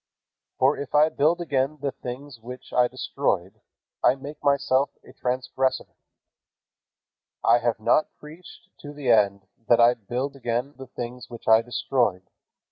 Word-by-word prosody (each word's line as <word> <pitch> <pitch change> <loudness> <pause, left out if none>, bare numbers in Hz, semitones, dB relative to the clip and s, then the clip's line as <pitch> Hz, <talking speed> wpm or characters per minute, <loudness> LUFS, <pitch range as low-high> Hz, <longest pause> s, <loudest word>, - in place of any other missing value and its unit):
For 135 +3 +3
if 140 - -5
I 150 +1 +6
build 160 +4 +1
again 145 -2 0
the 140 0 -2
things 125 +1 -8
which 125 +3 -10
I 125 -1 +4
destroyed, 120 -7 -2 0.4
I 125 - +5
make 145 +3 -10
myself 140 -1 +2
a - - -16
transgressor. 130 +1 -2 1.5
"I 120 - +5
have 120 -1 -1
not 120 +7 +3
preached 160 +4 -14
to 145 0 -9
the 140 -4 0
end 100 -3 +3 0.2
that 120 - +5
I 120 +1 +7
build 125 +5 -4
again 125 +1 -2
the 135 -1 -10
things 125 0 -7
which 120 -1 -11
I 110 0 +7
destroyed. 120 -5 -1
130 Hz, 145 wpm, -25 LUFS, 120-140 Hz, 1.5 s, I